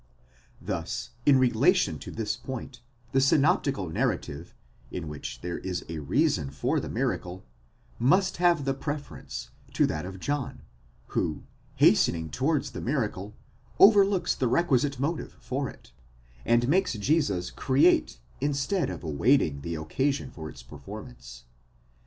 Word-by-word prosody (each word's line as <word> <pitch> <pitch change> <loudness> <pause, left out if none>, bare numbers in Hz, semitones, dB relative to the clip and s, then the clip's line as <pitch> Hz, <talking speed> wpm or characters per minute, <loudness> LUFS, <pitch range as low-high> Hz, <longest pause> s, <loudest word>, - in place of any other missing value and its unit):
'Thus - - -4 0.2
in 140 -2 +7
relation 130 -2 +3
to - - -8
this 110 -1 -2
point, 120 0 -7 0.3
the 135 - +3
synoptical 135 - +2
narrative, 80 - -2 0.3
'in 85 -3 -5
which 75 -2 -7
there 85 0 -4
is 90 -2 -4
a 80 -1 -4
reason 90 - +1
for 70 - 0
the - - -5
miracle, 90 +1 -2 0.5
must 185 +10 +3
have 175 -5 +3
the 135 - +1
preference 145 +1 -6 0.2
to - - +3
that 75 -1 -2
of 95 0 -7
John, 145 +4 -3 0.5
who, 75 -2 -1 0.3
hastening 80 -2 +3
towards 140 - 0
the - - -6
miracle, 110 -6 -2 0.4
overlooks 200 -2 +6
the 130 - 0
requisite 140 -1 +2
motive 155 +4 -3
for 135 +1 -3
it, - - -15 0.5
and 120 +1 +3
makes 185 +7 +2
Jesus 115 - 0
create 65 - +3 0.2
instead 145 +7 0
of - - -6
awaiting 80 - +2
the 85 +3 -4
occasion 130 - -1
for 80 -6 -8
its 65 - -12
perform - - -9
_ance. - - -13
125 Hz, 135 wpm, -27 LUFS, 85-145 Hz, 0.5 s, in